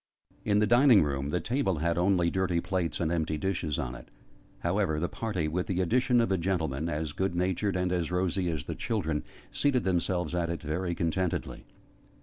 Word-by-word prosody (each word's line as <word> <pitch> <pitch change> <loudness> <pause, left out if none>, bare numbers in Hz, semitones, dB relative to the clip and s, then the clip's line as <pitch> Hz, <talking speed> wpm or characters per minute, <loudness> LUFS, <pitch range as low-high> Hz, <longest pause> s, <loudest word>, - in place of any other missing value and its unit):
In 105 -1 +2
the 105 - +4
dining 120 - +6
room, 70 -1 -2
the 90 - 0
table 115 - 0
had 85 +2 0
only 90 -1 +2
dirty 95 -2 +1
plates 90 -2 -2
and 80 -2 0
empty 80 -2 0
dishes 85 -3 -2
on - - -3
it. 65 - -11 0.5
However 75 -1 0
the 85 - 0
party 95 -8 -2
with 90 +4 -2
the 95 -1 -1
addition 125 +7 +3
of 115 -3 +1
a 95 - +2
gentleman, 80 -4 -1
as 75 -1 -2
good 95 +2 -1
natured, 95 +2 0
and 90 0 0
as 90 -3 0
rosy, 90 0 0
as 80 -5 -2
the - - -5
children 80 -9 -2 0.3
seated 135 -4 +1
themselves 90 -1 0
at 85 -1 0
it 85 0 -4
very 85 +3 -2
contentedly. 85 +2 -2
90 Hz, 190 wpm, -29 LUFS, 80-95 Hz, 0.5 s, dining